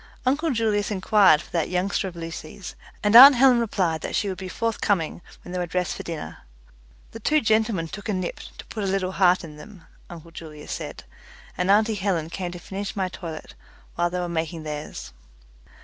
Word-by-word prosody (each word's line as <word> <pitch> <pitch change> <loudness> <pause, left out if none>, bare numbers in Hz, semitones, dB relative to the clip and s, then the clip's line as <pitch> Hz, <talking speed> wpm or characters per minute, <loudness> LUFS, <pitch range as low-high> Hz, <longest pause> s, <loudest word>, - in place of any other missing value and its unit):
Uncle 290 +6 +1
Julius 220 -5 0
inquired 190 -5 +4
for - - -18
that 165 -2 -1
youngster 190 +2 -1
of 180 - -8
Lucy's, 165 +2 -8 0.3
and 210 +1 +3
aunt 270 +3 +12
Helen 250 -1 +5
replied 185 -8 -1
that - - -4
she 205 - 0
would 190 - -4
be 190 - -6
forthcoming 200 -5 -1 0.2
when 175 - -10
they 180 - -3
were 175 - -2
dressed 180 +1 -2
for - - -6
dinner. 155 - -7 0.7
The 225 - -9
two 305 +8 +2
gentlemen 220 - +1
took 200 +6 -8
a - - +1
nip, 185 -2 -3 0.2
to - - -10
put 215 - -6
a - - -1
little 190 -1 -1
heart 185 -1 +3
in 150 -2 -10
them 180 +3 -13 0.3
uncle 165 -1 -11
Julius 155 -2 -10
said, - - -6 0.5
and 180 +1 -1
auntie 215 +2 +4
Helen 185 -6 -2
came 180 -1 -4
to 175 - -8
finish 195 +3 -6
my 190 -2 -1
toilet 165 -4 -8 0.4
while 175 0 0
they 180 +1 -3
were 175 - -2
making 165 -1 -3
theirs. 150 - -7
185 Hz, 195 wpm, -24 LUFS, 170-210 Hz, 0.7 s, aunt